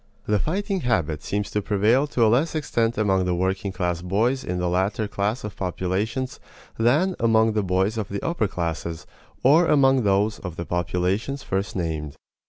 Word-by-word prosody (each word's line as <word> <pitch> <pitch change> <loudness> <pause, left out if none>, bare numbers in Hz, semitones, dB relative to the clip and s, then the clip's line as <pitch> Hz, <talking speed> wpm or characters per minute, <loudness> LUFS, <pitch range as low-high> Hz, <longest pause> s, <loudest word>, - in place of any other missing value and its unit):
The 105 -1 +1
fighting 195 - -1
habit 85 - 0
seems 100 +7 -3
to 105 - 0
prevail 110 +8 +2
to 120 -5 +2
a - - +5
less 135 +9 +2
extent 120 -6 0
among 95 -3 +2
the 90 -1 0
working 95 +2 -1
class 90 -2 -2
boys 110 +9 0
in 90 - -3
the 90 0 -1
latter 95 +4 0
class 105 +4 -2
of 105 -2 -6
populations 95 +8 -2 0.4
than 150 +11 +3
among 110 -1 +3
the 105 - +1
boys 95 +4 0
of 105 - -4
the 100 0 -4
upper 165 -11 0
classes 85 -2 -4 0.4
or 160 +6 +5
among 135 -3 +4
those 105 +1 +1
of 90 -4 -7
the 85 - -5
populations 90 - -1
first 95 0 -2
named. 80 -5 -3
105 Hz, 180 wpm, -24 LUFS, 90-120 Hz, 0.4 s, a